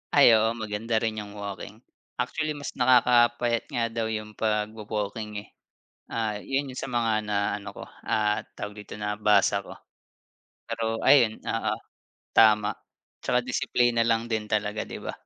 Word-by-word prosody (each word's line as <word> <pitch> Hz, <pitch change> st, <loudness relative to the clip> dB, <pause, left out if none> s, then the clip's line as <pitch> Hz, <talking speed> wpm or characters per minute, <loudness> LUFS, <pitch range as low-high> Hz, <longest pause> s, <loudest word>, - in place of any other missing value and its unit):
Ay 145 Hz, -, +8 dB
oo, 110 Hz, +1 st, +2 dB
maganda 110 Hz, 0 st, -3 dB
rin 110 Hz, -1 st, -1 dB
yung 105 Hz, 0 st, -8 dB
walking. 100 Hz, +2 st, -7 dB, 0.3 s
Actually 150 Hz, +5 st, -2 dB
mas 145 Hz, -1 st, -6 dB
nakakapayat 120 Hz, -1 st, +4 dB
nga 120 Hz, -, -1 dB
daw 115 Hz, -1 st, -2 dB
yung 110 Hz, -1 st, -4 dB
pagwo-walking 105 Hz, -1 st, -2 dB
eh. -, -, -20 dB, 0.7 s
Ah, 110 Hz, -2 st, -1 dB
yung 135 Hz, +1 st, -1 dB
'yon 130 Hz, -, -9 dB
sa 135 Hz, -, -4 dB
mga 115 Hz, -2 st, +1 dB
na 105 Hz, -1 st, -1 dB, 0.2 s
ano 100 Hz, -, -8 dB
ko, -, -, -10 dB, 0.2 s
ah, 105 Hz, 0 st, +1 dB, 0.2 s
tawag 105 Hz, 0 st, -5 dB
dito, -, -, -9 dB
nabasa 105 Hz, -1 st, +2 dB
ko. -, -, -10 dB, 0.9 s
Pero 115 Hz, 0 st, -2 dB
ayon, 120 Hz, -6 st, +5 dB
oo, -, -, -1 dB, 0.6 s
tama. 105 Hz, -2 st, +5 dB, 0.5 s
'Tsaka 125 Hz, -, +2 dB
disiplina 120 Hz, -1 st, +2 dB
lang 115 Hz, 0 st, +1 dB
din 110 Hz, -1 st, 0 dB
talaga, 105 Hz, 0 st, 0 dB
'di -, -, -7 dB
ba? -, -, -4 dB
110 Hz, 150 wpm, -26 LUFS, 105-120 Hz, 0.9 s, Ay